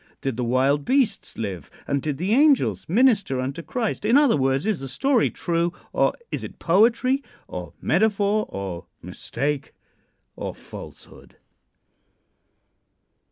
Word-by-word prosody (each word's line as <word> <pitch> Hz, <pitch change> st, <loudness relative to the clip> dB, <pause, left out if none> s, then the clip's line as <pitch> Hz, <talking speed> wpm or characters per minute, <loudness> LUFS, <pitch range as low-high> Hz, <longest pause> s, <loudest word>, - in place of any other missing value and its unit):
Did 135 Hz, -3 st, -2 dB
the 125 Hz, -, -2 dB
wild 135 Hz, +4 st, +2 dB
beasts 260 Hz, -, 0 dB
live 95 Hz, -9 st, -5 dB, 0.2 s
and 140 Hz, -1 st, 0 dB
did 150 Hz, -2 st, -2 dB
the 185 Hz, +7 st, 0 dB
angels 285 Hz, -, +3 dB
minister 205 Hz, -, +3 dB
unto 135 Hz, +6 st, -3 dB
Christ? 225 Hz, +4 st, -3 dB
In 230 Hz, +6 st, +5 dB
other 290 Hz, -4 st, +5 dB
words, 135 Hz, +1 st, +1 dB
is 215 Hz, -5 st, 0 dB
the 135 Hz, -, -5 dB
story 245 Hz, -, +2 dB
true, 170 Hz, 0 st, -1 dB, 0.2 s
or -, -, +3 dB, 0.2 s
is -, -, -3 dB
it -, -, -8 dB
poetry, 230 Hz, +9 st, +3 dB, 0.3 s
or -, -, -7 dB
metaphor, 210 Hz, 0 st, +2 dB
or 95 Hz, -3 st, -6 dB, 0.2 s
mistake, 145 Hz, 0 st, -3 dB, 0.6 s
or -, -, -5 dB
falsehood? -, -, -12 dB
170 Hz, 130 wpm, -24 LUFS, -, 0.6 s, In